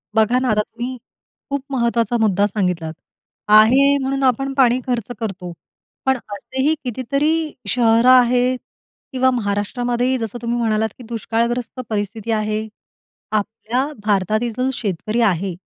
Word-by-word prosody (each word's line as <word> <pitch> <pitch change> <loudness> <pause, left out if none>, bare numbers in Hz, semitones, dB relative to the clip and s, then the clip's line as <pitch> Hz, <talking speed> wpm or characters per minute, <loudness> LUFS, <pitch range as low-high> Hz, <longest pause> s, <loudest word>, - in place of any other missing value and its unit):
बघा 220 +3 +3
ना, 255 0 0
आता 210 0 +3
तुम्ही 240 +4 -6 0.5
खूप 280 -1 -2
महत्त्वाचा 235 -2 +1
मुद्दा 205 -2 +3
सांगितलात. 180 -6 -2 0.5
आहे 250 +7 +6
म्हणून 270 0 -2
आपण 270 +2 +1
पाणी 255 -2 +4
खर्च 245 -2 -2
करतो. 195 -5 -5 0.5
पण 265 -1 +3 0.2
असेही 265 +9 -1
कितीतरी 280 +6 -1 0.2
शहरं 230 0 +4
आहेत 250 0 +5 0.5
किंवा 260 -1 +2
महाराष्ट्रामध्येही 245 +3 -1
जसं 225 -1 -4
तुम्ही 235 0 -1
म्हणालात 220 -1 +1
की 250 - -11
दुष्काळग्रस्त 235 +2 -2
परिस्थिती 215 +1 -3
आहे. 215 0 -1 0.6
आपल्या 220 +4 -1 0.2
भारतातील 215 +3 +1
जो 255 +1 +1
शेतकरी 215 +1 -2
आहे 190 -4 +1
235 Hz, 125 wpm, -20 LUFS, 215-255 Hz, 0.6 s, आहे